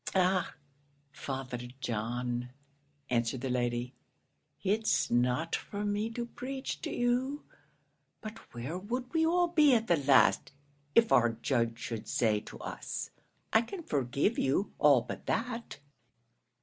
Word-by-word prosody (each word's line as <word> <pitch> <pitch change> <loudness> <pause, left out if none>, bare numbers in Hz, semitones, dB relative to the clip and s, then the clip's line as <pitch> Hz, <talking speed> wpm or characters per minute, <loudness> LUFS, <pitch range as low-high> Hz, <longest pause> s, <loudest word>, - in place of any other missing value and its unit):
"Ah, 185 -1 +2 0.6
Father 135 -3 -5 0.2
John," 120 +2 -2 0.6
answered 120 +1 0
the 130 -1 -2
lady; 120 0 -1 0.7
"it's 205 -7 +1
not 125 +7 +2
for 205 0 -4
me 205 +2 0
to 235 +1 -4
preach 265 +3 -5
to - - -3
you; 250 +4 0 0.8
but 220 +1 -8
where 130 +9 -5
would 245 - -4
we 325 -1 +3
all 350 +1 +3
be 300 -6 +5
at 225 -1 +1
the 170 -6 +3
last, 140 -1 +4 0.4
if 230 -1 +5
our 120 -1 +5
Judge 115 0 0
should 115 -2 -5
say 110 -3 +2
to 105 - -11
us, - - -5 0.4
'I 220 - +6
can 340 +9 -7
forgive 140 - 0
you 140 +9 +1
all 140 -4 +6
but 120 - -8
that?'" 230 -4 -2
155 Hz, 135 wpm, -31 LUFS, -, 0.8 s, I